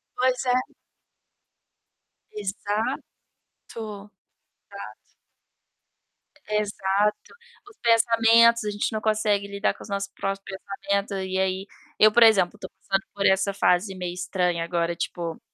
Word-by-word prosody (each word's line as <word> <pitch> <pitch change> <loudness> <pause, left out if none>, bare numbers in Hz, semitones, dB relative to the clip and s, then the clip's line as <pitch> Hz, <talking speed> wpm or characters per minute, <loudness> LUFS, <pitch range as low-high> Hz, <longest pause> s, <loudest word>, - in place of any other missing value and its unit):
Pois 255 0 +1
é. 250 0 0 1.6
Exato. 210 +5 -2 0.7
Exato. 210 -2 -8 2.4
Exato. 210 0 +1 0.5
Os 425 - -18
pensamentos, 230 0 +5
a 210 - -1
gente 205 +2 -2
não 215 - -2
consegue 215 -2 +1
lidar 200 +1 -1
com - - -14
os - - -11
nossos 200 0 -3
próprios 195 0 -3 0.4
pensamentos 200 0 0
e 190 0 -2
aí 190 +1 -1 0.3
eu, 215 0 +7
por 235 - +5
exemplo, 210 -3 +5
tô - - -8
passando 195 0 -3
por 200 -1 0
essa 190 +1 +3
fase 190 0 +2
meio 180 -1 -4
estranha 180 -2 -1
agora, 170 0 -1
tipo, 170 -2 -4
200 Hz, 120 wpm, -25 LUFS, 190-220 Hz, 2.4 s, eu